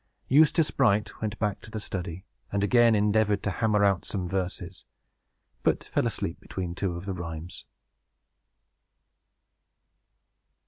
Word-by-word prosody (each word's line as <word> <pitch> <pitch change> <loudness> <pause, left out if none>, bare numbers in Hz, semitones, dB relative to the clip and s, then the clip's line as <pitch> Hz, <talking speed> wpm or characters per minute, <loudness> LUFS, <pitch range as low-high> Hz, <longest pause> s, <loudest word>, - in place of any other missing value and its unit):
Eustace 155 +3 +4
Bright 105 -5 +1
went 110 -2 -2
back 105 -1 -1
to - - -11
the 110 - -4
study, 90 -2 -5 0.3
and 100 0 0
again 120 +1 +5
endeavored 105 -1 +2
to 100 - 0
hammer 105 -1 +2
out 100 -2 +2
some 95 -3 -3
verses, 95 0 -4 0.8
but - - +1
fell - - 0
asleep - - -3
between 90 -2 -5
two 90 -1 -2
of 85 +2 -7
the 100 - -3
rhymes. 85 -1 -7
100 Hz, 130 wpm, -27 LUFS, 90-110 Hz, 0.8 s, again